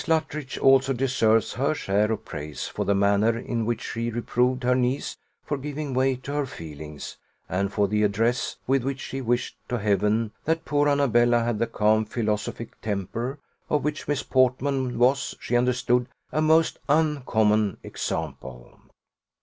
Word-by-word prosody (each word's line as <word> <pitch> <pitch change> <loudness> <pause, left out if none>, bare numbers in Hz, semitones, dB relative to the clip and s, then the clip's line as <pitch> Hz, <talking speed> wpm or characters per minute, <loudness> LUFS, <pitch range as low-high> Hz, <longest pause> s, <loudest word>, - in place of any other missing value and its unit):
Luttridge 155 -3 -1
also 135 0 +4
deserves 115 -4 +2
her 140 +4 0
share 105 -2 +1
of 110 - -3
praise 75 -4 -6
for - - -3
the 100 - +2
manner 100 +3 +3
in 115 -1 -2
which 120 -1 -1
she 115 0 -3
reproved 125 +2 0
her 125 +1 +3
niece 125 +2 0 0.3
for 145 - -3
giving 145 0 -4
way 130 +1 +2
to 130 +3 -7
her 145 -2 0
feelings, 75 - -8 0.3
and 100 +2 -1
for 100 0 +2
the 105 +2 0
address 115 +4 +1
with 135 -1 +2
which 135 0 -2
she 135 0 -5
wished 120 0 -1
to 125 - 0
Heaven 105 +1 +1
that 160 +1 0
poor 145 0 +2
Annabella 120 -4 +3
had 115 -2 -1
the 115 - +1
calm 110 0 +2
philosophic 110 0 -3
temper 110 +6 -3 0.3
of 150 - +1
which 150 0 -3
Miss 145 -1 0
Portman 130 -1 +1
was, 130 +3 +2
she 120 - -2
understood, 125 0 +2 0.2
a 155 - +1
most 160 +1 +3
uncommon 110 - +2
example. 60 -2 -5
120 Hz, 155 wpm, -25 LUFS, 105-135 Hz, 0.3 s, also